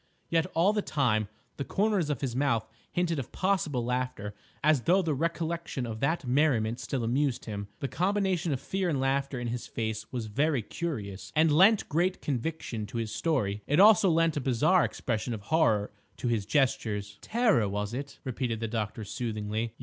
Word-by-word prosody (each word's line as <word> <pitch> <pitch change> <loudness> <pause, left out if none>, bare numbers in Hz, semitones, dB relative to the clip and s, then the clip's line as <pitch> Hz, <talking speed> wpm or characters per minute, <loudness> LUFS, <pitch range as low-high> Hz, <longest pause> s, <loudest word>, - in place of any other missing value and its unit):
Yet, 165 +1 +2
all 180 +6 +4
the 210 - +1
time, 115 - +1 0.3
the 140 - -2
corners 200 -2 +1
of 145 -5 -2
his 130 -4 -2
mouth 120 -5 +1 0.2
hinted 170 -3 0
of 130 - -6
possible 165 -10 0
laughter 125 -4 -2 0.3
as 150 -3 +4
though 185 +7 +3
the 160 -3 0
recollection 165 -2 -2
of 110 -2 -5
that 140 +3 0
merriment 125 -4 +2
still 130 -4 -3
amused 130 +2 0
him. 100 -2 -5
The 140 - -1
combination 185 -1 0
of 135 - -1
fear 190 +6 -1
and 145 -5 0
laughter 135 0 0
in 120 -1 -3
his 120 +1 -4
face 110 -1 -4
was 120 -3 -3
very 140 +3 +1
curious, 105 - -5
and 155 +1 +4
lent 200 +6 +5
great 175 +5 +1
conviction 125 -5 -3
to 110 - -6
his 115 -2 -3
story; 105 -11 0
it 145 - +2
also 200 -1 +7
lent 165 -1 +3
a - - 0
bizarre 145 +8 +3
expression 115 0 -2
of 105 - -8
horror 110 -8 +2 0.3
to - - -3
his 110 -4 0
gestures. 105 -7 0
"Terror, 215 - +2
was 105 +2 -3
it?" 140 +3 -5
repeated 125 -3 -2
the 115 - -2
doctor 110 -1 -3
soothingly. 110 0 -3
135 Hz, 180 wpm, -29 LUFS, 110-165 Hz, 0.3 s, also